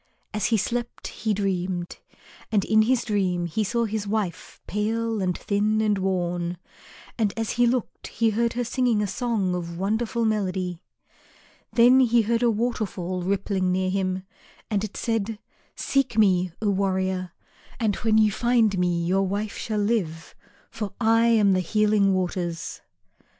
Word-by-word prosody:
As 210 - 0
he 225 - +2
slept 240 +4 -3
he 220 - -3
dreamed. 185 -3 -2 0.5
And 205 -3 +2
in 220 +1 +4
his 240 +2 +2
dream 185 -5 0
he 170 +6 -1
saw 235 +3 0
his 215 -1 -3
wife 200 -5 -3
pale 225 +1 -1
and 180 -2 0
thin 210 +1 0
and 210 -2 +1
worn, 175 -2 -1 0.6
and 210 -3 +2
as 225 -1 -1
he 240 0 +3
looked 245 0 -2
he 225 -1 +1
heard 235 +2 0
her 245 - -1
singing 235 -3 +1
a - - +1
song 200 -2 -1
of 170 -1 -4
wonderful 220 +4 0
melody. 185 -5 -1 0.9
Then 245 +2 +6
he 240 -2 +4
heard 230 +2 0
a 240 - +4
waterfall 210 -6 -2
rippling 190 0 0
near 185 0 0
him 185 -1 -1 0.5
and 205 -1 +1
it 215 - -5
said, 225 -1 -1 0.4
"Seek 275 -5 0
me, 185 -4 +3
O 205 - +2
warrior, 190 -2 -1 0.5
and 215 -4 +1
when 220 -1 +2
you 215 -1 +5
find 230 -3 +2
me 175 -1 +1
your 190 +2 +2
wife 205 +2 -3
shall 215 -2 -3
live, 205 -7 -1 0.4
for 215 -4 -5
I 225 0 +4
am 215 -4 +4
the 185 - +2
Healing 210 +1 +2
Waters." 175 -2 -3
205 Hz, 155 wpm, -25 LUFS, 185-225 Hz, 0.9 s, Then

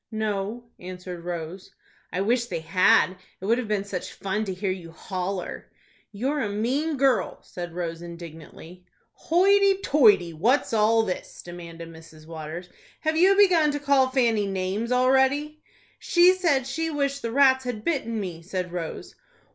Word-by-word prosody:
"No," 215 +1 -3 0.2
answered 180 -1 -8
Rose. 175 +1 -6 0.4
"I 185 - -2
wish 235 +4 +1
they 170 -6 -4
had. 185 +2 +3 0.2
It 190 - -7
would 230 +4 +2
have 245 - -4
been 210 -2 0
such 200 -3 -6
fun 210 +2 -3
to 190 - -3
hear 190 +1 -2
you 180 -3 -7
holler." 185 +2 -5 0.4
"You're 265 +8 -2
a 210 - -1
mean 265 +9 -1
girl," 265 -3 +1
said 175 -2 -8
Rose, 170 -2 -4
indignantly. 170 +1 -11 0.3
"Hoity 395 +3 +3
toity! 205 - +4
What's 230 - +1
all 225 +1 +3
this?" 185 -4 -6
demanded 170 -1 -9
Mrs. 160 -1 -14
Waters. 165 +2 -7 0.3
"Have 315 0 0
you 375 +4 +5
begun 360 -7 +5
to 290 - -2
call 280 -2 +3
Fanny 230 -6 +1
names 195 +4 -2
already?" 265 +4 +2 0.4
"She 355 +1 +5
said 330 -9 +1
she 325 +5 -2
wished 280 -2 -1
the 230 - -3
rats 260 0 +4
had 220 -4 -5
bitten 230 -9 -1
me," 175 -5 -5
said 180 0 -4
Rose. 170 -2 -6
210 Hz, 155 wpm, -25 LUFS, 180-270 Hz, 0.4 s, you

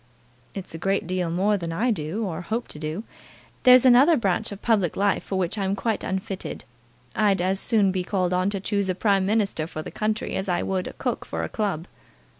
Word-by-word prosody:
"It's 195 -4 -6
a 165 - -6
great 195 +2 0
deal 180 -1 -1
more 195 +5 +1
than 170 -3 -5
I 225 +9 +1
do, 185 +4 -2
or 170 -3 -4
hope 220 +7 -3
to 150 - -5
do. 155 +7 -4 0.6
There's 255 0 +7
another 265 +6 +6
branch 210 0 0
of 200 - -7
public 205 -8 +1
life 200 0 +1
for 195 - -4
which 185 +3 -1
I'm 195 0 0
quite 220 +2 -2
unfitted. 190 0 -4 0.5
I'd 205 -2 +2
as 190 +2 +1
soon 210 -5 +4
be 185 -1 -2
called 185 -1 -1
on 185 +2 +1
to 200 -1 -3
choose 200 0 -1
a 185 - 0
Prime 195 -1 +2
Minister 200 -7 0
for 155 -2 -6
the - - -8
country, 215 0 -2
as 190 +1 -3
I 175 -1 0
would 185 -1 -2
a - - -7
cook - - -3
for - - -4
a - - -3
club." 195 -7 -2
195 Hz, 220 wpm, -24 LUFS, 180-210 Hz, 0.6 s, There's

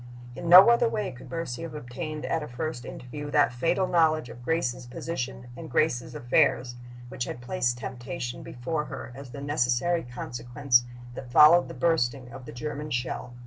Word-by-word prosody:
In 170 - -5
no 185 +6 +10
other 235 0 +3
way 210 -3 -2
could 125 -1 -12
Mercy 165 -7 -4
have 165 -2 -6
obtained 150 +3 -6
at 165 - -1
a 150 - -5
first 125 0 -5
interview 145 +4 -7
that 145 -3 +3
fatal 165 +9 +1
knowledge 160 -6 +2
of 120 - -11
Grace's 130 -5 -1
position 125 -2 -5
and 160 +3 -9
Grace's 125 -6 0
affairs 120 0 +2 0.4
which 125 -1 -4
had - - -6
placed 125 -2 -1
temptation 120 0 -6
before 150 +5 -4
her 130 - -7
as 135 +1 -10
the 140 +3 -8
necessary 145 +4 +1
consequence 120 +1 0 0.3
that 125 0 -9
followed 155 +6 +7
the - - -9
bursting 135 -6 0
of 125 +1 -10
the - - -8
German 150 +4 -5
shell. 125 -1 -3
135 Hz, 175 wpm, -27 LUFS, 120-160 Hz, 0.4 s, no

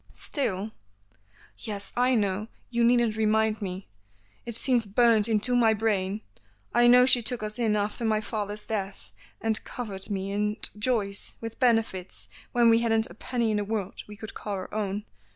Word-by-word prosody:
"Still 215 -7 -1 0.4
" 105 +1 -28
"Yes, 200 -2 -6
I 250 +1 +3
know, 205 -1 0 0.2
you 235 -1 +1
needn't 235 -2 +3
remind 220 0 +1
me, 190 -1 -5 0.6
it 235 - -4
seems 240 -2 +1
burnt 225 +1 +4
into 225 +3 +2
my 225 -2 +4
brain, 205 -2 0 0.5
I 240 0 +5
know 250 +1 +7
she 250 -2 +6
took 230 0 -3
us 215 +2 -4
in 220 -3 +2
after 210 +3 -2
my 220 -1 +2
father's 210 -1 -4
death, 200 -3 -4 0.3
and 225 -1 +1
covered 200 -6 -6
me 195 -1 -3
and 210 +1 -1
Joyce 210 -3 -1
with 225 0 -7
benefits 225 -7 0 0.2
when 235 -1 +5
we 225 - +5
hadn't 225 -1 +1
a - - -10
penny 235 -3 -1
in 210 - +1
the 205 - 0
world 205 -2 -4
we 210 - -10
could 220 +1 -8
call 205 - -5
our 185 -1 -7
own. 205 -1 -2
215 Hz, 175 wpm, -27 LUFS, 205-235 Hz, 0.6 s, know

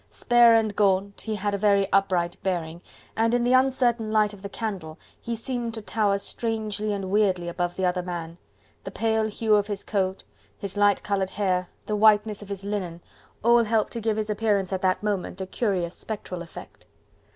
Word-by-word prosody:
Spare 240 -1 +5
and 220 -2 +1
gaunt, 200 0 +1
he 220 -1 -3
had 205 0 -2
a 200 - -1
very 200 -1 +3
upright 180 -3 +2
bearing, 170 -3 -3 0.3
and 230 +1 +2
in 245 - +1
the 245 +1 +2
uncertain 255 -4 +2
light 215 -1 +2
of 200 - -12
the 200 - -6
candle 190 -8 -5 0.2
he 235 - -3
seemed 235 0 -4
to 220 - -5
tower 210 -2 +1
strangely 215 0 -2
and 195 -2 -3
weirdly 190 -4 +2
above 175 0 -2
the 190 - -1
other 180 0 +1
man: 170 -1 -6 0.4
the - - -5
pale 220 +2 0
hue 220 0 0
of 205 -1 +3
his 205 -2 -3
coat, 190 -2 -1 0.3
his 200 0 -6
light 205 -1 +3
coloured 195 -2 -1
hair, 185 -3 -1 0.2
the 210 - -1
whiteness 210 0 +4
of 205 - -11
his 195 -1 -5
linen, 195 -5 -3 0.4
all 235 +1 +5
helped 220 -1 0
to 230 - -3
give 220 -1 0
to 215 - 0
his 215 0 -3
appearance 205 -3 0
at 185 - -2
that 185 +2 +1
moment 200 -3 -2
a 190 - -3
curious 185 -4 -1
spectral 185 -5 -6
effect. 165 - -11
205 Hz, 195 wpm, -25 LUFS, 190-220 Hz, 0.4 s, Spare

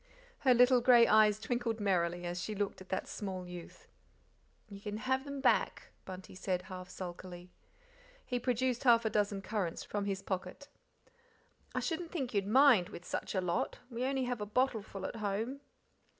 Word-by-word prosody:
Her 255 -2 +5
little 250 +1 +6
grey 240 -1 +7
eyes 215 -1 +5
twinkled 235 -1 -2
merrily 175 -3 0
as 175 +1 -3
she 215 - -4
looked 200 -1 -2
at 185 - -12
that 190 - -2
small 190 -3 -5
youth. 180 -1 -10 0.8
"You 200 -2 -10
can 210 0 -4
have 260 +5 0
them 280 -1 -5
back," - - +1
Bunty 185 0 -9
said, 185 -1 -2
half 185 -1 -8
sulkily. 180 -1 -8 0.7
He 245 - -1
produced 250 0 0
half 235 -3 +5
a 220 - +1
dozen 205 -1 0
currants 195 -5 -2
from 205 -1 -3
his 195 -1 -2
pocket. 190 +9 -5 1.1
"I - - +1
shouldn't 335 0 -3
think 265 -8 -3
you'd 200 -1 0
mind, 240 -6 +6
with 175 -4 -10
such - - -3
a 185 - +2
lot; 175 -1 -1
we 235 +1 -3
only 265 0 0
have 245 -3 -2
a 210 - -3
bottleful 215 -4 -1
at - - -7
home." 220 +6 -2
210 Hz, 175 wpm, -33 LUFS, 185-245 Hz, 1.1 s, grey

